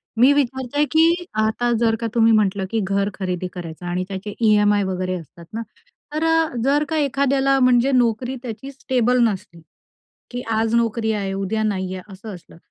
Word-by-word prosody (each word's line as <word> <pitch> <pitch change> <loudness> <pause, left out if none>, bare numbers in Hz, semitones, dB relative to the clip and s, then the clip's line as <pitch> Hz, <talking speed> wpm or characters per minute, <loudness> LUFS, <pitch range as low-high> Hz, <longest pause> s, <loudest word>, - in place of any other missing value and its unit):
आहे, 225 - -1
मी 265 +3 +7
विचारते 265 0 0
की 335 +2 +3 0.2
आता 220 +3 0
जर 225 -1 +2
का 230 - -2
तुम्ही 225 -1 +5
म्हटलं 200 -2 +2
की 225 - 0
घर 195 +1 0
खरेदी 185 -2 -3
करायचं 175 -1 -8
आणि 180 +1 -2
त्याचे 200 +1 -6
ईएमआय 210 -2 +4
वगैरे 185 -1 -2
असतात 170 +1 -14
ना, 225 - -3 0.5
तर 310 +1 -1
अ, 325 0 +3 0.2
जर 285 +3 +2
का 320 - -1
एखाद्याला, 275 -1 +2
म्हणजे 250 +1 +4
नोकरी 245 0 +1
त्याची 240 +3 -7
स्टेबल 250 -2 +1
नसली, 185 -6 -2 0.7
की 245 0 -5 0.2
आज 225 +1 0
नोकरी 230 -1 +1
आहे, 200 -2 -2
उद्या 195 +3 -2
नाही 190 -3 -2
आहे 185 - -7
असं 200 +2 -9
असलं. 175 -2 -14
225 Hz, 180 wpm, -21 LUFS, 195-260 Hz, 0.7 s, मी